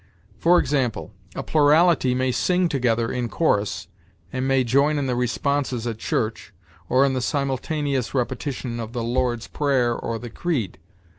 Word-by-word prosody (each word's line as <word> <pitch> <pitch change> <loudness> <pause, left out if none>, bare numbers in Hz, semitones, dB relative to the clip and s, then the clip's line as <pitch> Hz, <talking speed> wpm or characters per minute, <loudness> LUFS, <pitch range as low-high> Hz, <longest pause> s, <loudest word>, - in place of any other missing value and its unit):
For 175 +2 +5
example, 130 -6 0 0.2
a - - -3
plurality 155 -3 +4
may 130 0 +1
sing 180 +8 +2
together 120 -6 0
in 120 -2 -2
chorus, 100 - 0 0.5
and 130 0 -1
may 135 -1 +3
join 140 +5 +2
in 140 - -1
the 125 -2 0
responses 125 0 -1
at 115 -2 -4
church, 110 0 -2 0.4
or 130 +2 +4
in 135 - +1
the 130 - -1
simultaneous 140 -1 -1
repetition 125 -1 -2
of 115 0 -6
the 120 -2 -2
Lord's 120 -1 -1
Prayer 130 -5 +1
or 115 0 -3
the 120 0 -8
Creed. 120 - -2
130 Hz, 155 wpm, -23 LUFS, 120-140 Hz, 0.5 s, For